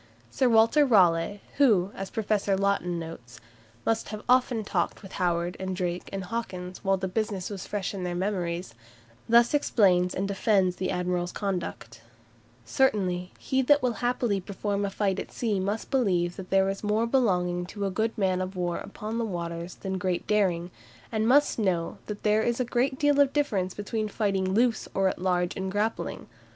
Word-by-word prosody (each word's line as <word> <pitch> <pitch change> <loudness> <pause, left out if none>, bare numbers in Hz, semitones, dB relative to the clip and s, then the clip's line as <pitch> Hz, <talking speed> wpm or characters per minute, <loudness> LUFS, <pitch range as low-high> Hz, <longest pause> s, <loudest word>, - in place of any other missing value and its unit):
Sir 255 - +2
Walter 230 +6 +5
Raleigh, 195 -5 +3 0.2
who, 210 -9 +4
as 195 0 -6
Professor 210 -2 0
Laughton 195 -3 0
notes, 125 -9 -8 0.5
"must 225 0 0
have 215 0 -6
often 250 -2 +3
talked 185 0 -2
with 195 - -10
Howard, 175 0 0
and 190 0 -3
Drake, 180 -1 -3
and 195 -1 -4
Hawkins, 185 -3 -5
while 195 0 +2
the 190 0 -3
business 200 -1 -2
was 195 -3 -6
fresh 205 -2 -3
in 190 -2 -5
their 175 -1 -2
memories," 180 -2 -2 0.6
thus 235 +2 +5
explains 185 -10 +3
and 195 +1 -1
defends 195 -2 +2
the 185 - -2
admiral's 180 0 -1
conduct: 175 - -4 0.6
"Certainly, 180 - +1
he 265 0 0
that 290 +2 +4
will 250 -2 +2
happily 240 -5 0
perform 200 +1 -2
a - - -1
fight 195 -1 -1
at - - -6
sea 215 -5 -1
must 205 +6 -3
believe 180 -10 +1
that 190 -2 -8
there 195 0 +3
is 195 +1 -3
more 210 +2 +1
belonging 180 -8 +1
to 205 +1 -4
a 195 - -1
good 220 +4 -1
man 185 -3 +1
of 185 +1 -4
war 175 -1 -1
upon 215 +3 -5
the - - 0
waters 170 -3 -4
than 190 -1 -4
great 180 -1 -1
daring, 180 -5 +1 0.4
and 220 0 0
must 285 0 +4
know 180 -5 0
that 210 -1 -6
there 215 0 +3
is 235 +2 0
a 250 - +1
great 260 +3 0
deal 290 0 +3
of 280 -1 +4
difference 205 -11 0
between 215 +1 -2
fighting 195 -3 0
loose 235 0 +2
or 195 0 +3
at - - -5
large 180 -1 0
and 190 0 -3
grappling. 210 +3 -2
195 Hz, 185 wpm, -27 LUFS, 180-220 Hz, 0.6 s, Walter